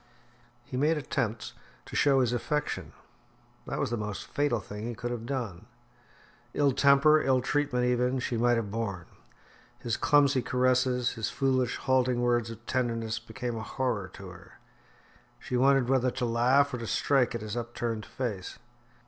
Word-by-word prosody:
He 125 - -5
made 155 +4 +2
attempts 130 -7 -3 0.3
to - - -9
show 135 -2 +4
his 125 -1 +1
affection. 150 +5 -2 0.7
This - - -3
was 140 -4 -1
the 120 - 0
most 105 -2 -5
fatal 145 -5 0
thing 105 +2 -7
he 120 - -4
could 120 +3 -4
have 120 -1 -5
done. 120 -10 -4 0.9
Ill 145 -1 +3
temper, 140 +3 +5
ill 130 -1 +3
treatment 130 -1 0
even, 125 +1 +1
she 125 -1 -2
might 120 +1 +3
have 105 -3 -3
borne. 100 -6 -3 0.7
His 120 - -2
clumsy 145 -3 +4
caresses, 125 -1 +1
his 115 -2 -3
foolish, 130 -3 0
halting 130 -2 +1
words 120 -1 +1
of 115 - -10
tenderness 115 -3 -1
became 120 +1 -5
a 110 - -4
horror 115 -4 -2
to - - -9
her. - - -14 0.8
She 125 - -5
wondered 135 0 +4
whether 130 -1 +2
to 125 0 -2
laugh 130 +4 +3
or 125 - -3
to 115 - -5
strike 130 -2 +2
at 115 - -4
his 105 0 -5
upturned 120 -2 -3
face. 105 -8 -4
125 Hz, 165 wpm, -29 LUFS, 115-135 Hz, 0.9 s, temper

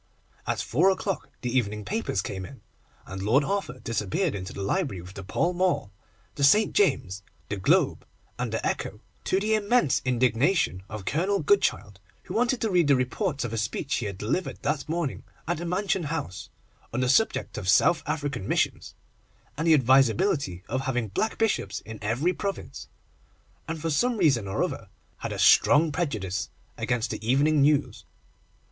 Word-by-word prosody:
At - - -1
four 165 +11 +3
o'clock 195 0 -2
the 125 -1 -3
evening 105 -4 0
papers 205 - -1
came 95 -1 -5
in, 130 +8 -11 0.4
and 95 0 -7
Lord 120 +9 +3
Arthur 195 -7 -2
disappeared 115 - -1
into 95 -1 -5
the 100 - -5
library 135 - -1
with 90 +2 -11
the 100 - -8
Pall 170 - 0
Mall, 180 - 0 0.4
the 140 - -3
St. 210 +10 +5
James's, 120 - +1 0.3
the 105 - -2
Globe, 95 - +2 0.4
and - - -2
the - - -2
Echo, - - -3 0.2
to 190 - +2
the 215 +2 0
immense 215 - +2
indignation 125 - +1
of 105 -3 -7
Colonel 185 - +1
Goodchild, 405 - +1 0.2
who - - -8
wanted 245 +2 +1
to 220 - 0
read 175 -4 +3
the 140 - +5
reports 140 - -1
of 120 -2 -4
a 115 - -1
speech 110 +6 -2
he 115 - -2
had 100 -2 -6
delivered 125 - -3
that 145 0 -1
morning 165 -4 -2 0.3
at 175 - 0
the 170 +2 -5
Mansion 185 -1 0
House, 145 - -4 0.4
on 120 - -1
the 130 - +1
subject 220 - +2
of 95 -3 -3
South 170 - +4
African 145 -9 -3
Missions, - - -1 0.6
and 160 +3 -2
the 160 - +7
advisability 130 - +2
of 130 +3 -1
having 125 -5 -2
black 215 - -1
Bishops 150 - 0
in 110 -1 -9
every 120 +12 0
province, 200 0 -5 0.8
and 165 0 -4
for 165 +1 -2
some 240 - +1
reason 135 - +2
or 95 - 0
other - - -4 0.3
had - - -5
a - - -4
strong 150 +2 +5
prejudice 110 - -2 0.3
against 120 -1 -1
the - - -5
Evening 140 +6 +3
News. 140 -5 +2
140 Hz, 175 wpm, -26 LUFS, 110-180 Hz, 0.8 s, the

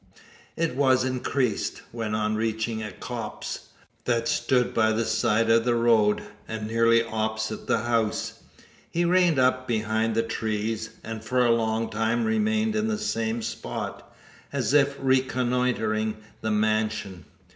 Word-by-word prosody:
It 165 -5 0
was 130 -2 +3
increased, 130 -3 -1
when 115 -2 -3
on 110 0 0
reaching 110 0 -1
a 105 -1 -5
copse, 115 +2 -6 0.4
that 115 -1 +1
stood 125 +1 +1
by 110 -1 +3
the 115 +1 0
side 110 +1 +2
of 115 0 +5
the 120 0 +2
road, 115 -3 +3 0.2
and 110 -1 -4
nearly 115 +1 +3
opposite 110 -1 -3
the 110 - +1
house, 115 -2 -1 0.5
he 175 +1 0
reined 175 -3 +4
up 130 0 +2
behind 110 0 0
the 115 - +2
trees, 110 0 -2
and 110 -1 -6
for 125 +2 +2
a 120 - +4
long 115 0 0
time 110 +2 0
remained 220 0 +1
in 215 0 +1
the 220 -1 0
same 115 - -2
spot, - - -5 0.4
as 130 -4 -1
if 140 -1 +4
reconnoitring 125 -4 +1 0.2
the 110 - -1
mansion. 110 -3 0
115 Hz, 145 wpm, -26 LUFS, 110-130 Hz, 0.5 s, of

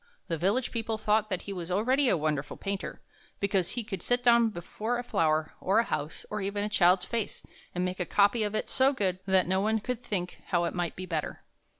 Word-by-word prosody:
The 165 - 0
village 205 - +1
people 225 -1 -2
thought 215 0 +1
that 185 - -2
he 200 - -5
was 175 -2 -5
already 250 +8 +2
a 185 - +3
wonderful 150 -2 -2
painter, 195 -1 -4 0.4
because 195 -3 +1
he 240 - -2
could 205 -3 -5
sit 245 0 +1
down 235 -2 +6
before 215 +5 -3
a 245 - -3
flower, 155 -8 +1
or 190 - +2
a 230 - +5
house, 150 -8 -4
or 210 -1 -2
even 200 +1 -2
a 210 - -1
child's 180 -3 +4
face, 230 -3 -3 0.3
and 180 +1 0
make 185 +1 -3
a 180 - 0
copy 205 +3 +3
of 210 0 -1
it - - -1
so 265 +2 +3
good 190 -7 0
that 190 -1 +4
no 190 +1 +2
one 220 +2 +2
could 250 +2 -4
think 180 -6 -4
how 175 -1 +2
it 170 - -1
might 175 -2 -2
be 185 - -5
better. 160 -4 -3
200 Hz, 230 wpm, -29 LUFS, 180-225 Hz, 0.4 s, down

